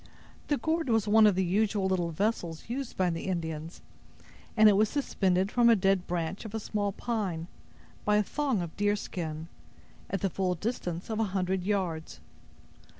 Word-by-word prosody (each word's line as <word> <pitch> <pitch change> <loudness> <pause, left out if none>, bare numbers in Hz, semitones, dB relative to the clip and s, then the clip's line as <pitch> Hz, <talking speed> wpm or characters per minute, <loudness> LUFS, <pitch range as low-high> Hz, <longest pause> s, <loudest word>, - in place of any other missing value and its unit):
The 290 - +1
gourd 320 -1 -1
was 225 -2 +2
one 215 +1 +7
of 205 - +3
the 190 0 +1
usual 205 +2 +1
little 185 -3 +1
vessels 170 -2 -2
used 260 +2 -4
by 185 -2 +2
the 165 - -4
Indians, 165 -2 -4 0.8
and 215 0 +8
it 210 - +6
was 210 +1 +3
suspended 190 -9 0
from 240 -1 +5
a 230 - +7
dead 195 -2 +1
branch 170 +1 -2
of 220 -1 -7
a - - -1
small 205 -1 -1
pine, 195 -7 -2 0.6
by 210 - +3
a 210 - +4
thong 265 -5 -1
of 165 - -7
deerskin, 175 -6 -2 0.6
at 195 - -2
the 195 - +1
full 185 0 0
distance 180 -2 -4
of 220 - -1
a - - +3
hundred 185 0 0
yards. 180 -5 -2
195 Hz, 175 wpm, -29 LUFS, 175-220 Hz, 0.8 s, and